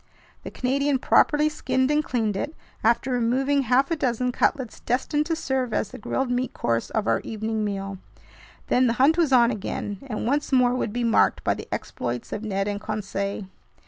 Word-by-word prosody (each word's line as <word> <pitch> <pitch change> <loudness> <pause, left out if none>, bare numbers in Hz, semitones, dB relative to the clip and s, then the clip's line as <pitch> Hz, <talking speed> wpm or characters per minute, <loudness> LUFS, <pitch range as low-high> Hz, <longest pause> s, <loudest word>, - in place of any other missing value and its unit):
The - - -7
Canadian 275 +2 0
properly 295 +3 +3
skinned 265 -3 0
and 300 +1 +2
cleaned 225 -7 -1
it, 290 +10 -3 0.3
after 235 +3 +2
removing 260 +4 +2
half 260 +4 +2
a - - +3
dozen 250 -3 0
cutlets 255 -1 0
destined 295 +5 0
to 330 - 0
serve 260 -7 -1
as 205 - 0
the - - -9
grilled 255 +4 -2
meat 250 +1 -1
course 115 0 -1
of 215 -2 -1
our - - +2
evening 220 0 -3
meal. 195 -2 -4 0.7
Then 255 0 +3
the 230 - +2
hunt 275 +6 +4
was 330 -5 +2
on 240 -2 +5
again, 205 -1 -4
and 215 -4 -3
once 290 +5 0
more 250 -2 +4
would 250 -4 -1
be 240 +2 -2
marked 230 -1 +3
by - - +2
the - - -9
exploits 120 0 -4
of 210 - -4
Ned 195 -2 -1
and 205 0 -3
Conseil. 200 -2 -3
245 Hz, 190 wpm, -25 LUFS, 215-270 Hz, 0.7 s, on